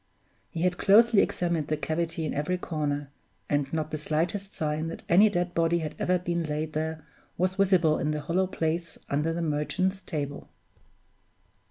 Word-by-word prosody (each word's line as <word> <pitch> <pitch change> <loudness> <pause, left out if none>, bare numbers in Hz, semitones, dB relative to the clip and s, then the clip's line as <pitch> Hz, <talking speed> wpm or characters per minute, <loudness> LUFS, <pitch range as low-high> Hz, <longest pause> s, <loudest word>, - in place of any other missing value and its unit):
He 165 -1 -3
had 180 -1 +1
closely 220 +1 +6
examined 170 -4 0
the 155 - 0
cavity 160 +1 -2
in - - -2
every 150 +6 -1
corner, 145 -5 -3 0.4
and 145 -2 0
not 155 -1 -2
the 155 - -3
slightest 170 +6 -1
sign 155 +1 -2
that 165 - -7
any 200 +5 +6
dead 175 -2 -1
body 165 0 +2
had 155 -3 -3
ever 180 0 +2
been 170 -1 -2
laid 155 0 -3
there 155 0 -3 0.3
was 185 +1 +1
visible 185 -5 +3
in 150 - 0
the 150 0 -1
hollow 185 +5 +1
place 165 -2 -2
under 150 +3 +1
the 170 +1 -2
Merchant's 185 +5 -1
Table. 145 -5 -5
165 Hz, 170 wpm, -27 LUFS, 155-180 Hz, 0.4 s, closely